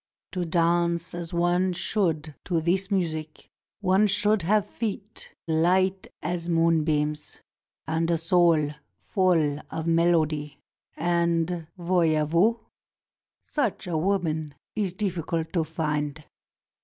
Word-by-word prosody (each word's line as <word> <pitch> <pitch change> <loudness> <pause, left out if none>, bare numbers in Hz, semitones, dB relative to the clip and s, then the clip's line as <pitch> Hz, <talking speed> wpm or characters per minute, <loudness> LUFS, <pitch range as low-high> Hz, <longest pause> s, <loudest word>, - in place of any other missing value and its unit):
To 180 -2 -2
dance 170 0 +1
as 175 -1 -5
one 175 +2 +1
should 165 -5 -1
to 170 -3 +1
this 185 +4 0
music 160 -6 -3 0.3
one 195 +2 +4
should 205 +1 +3
have 205 +4 +2
feet 210 -1 -5 0.2
light 185 +4 +2 0.2
as 175 -1 -3
moonbeams 155 -3 +1 0.4
and 165 +1 0
a 170 - +2
soul 165 -3 +3 0.3
full 165 -7 +1
of 160 - -4
melody, 160 -3 +1 0.4
and, 170 0 0
voyez 170 -4 +2
vous? 220 +8 +3 0.8
such 265 -9 -2
a 175 -2 -3
woman 160 -4 -1 0.2
is 195 -4 -1
difl&cult 170 -4 -2
to 170 -3 +2
find. 150 -2 -3
170 Hz, 110 wpm, -26 LUFS, 160-185 Hz, 0.8 s, one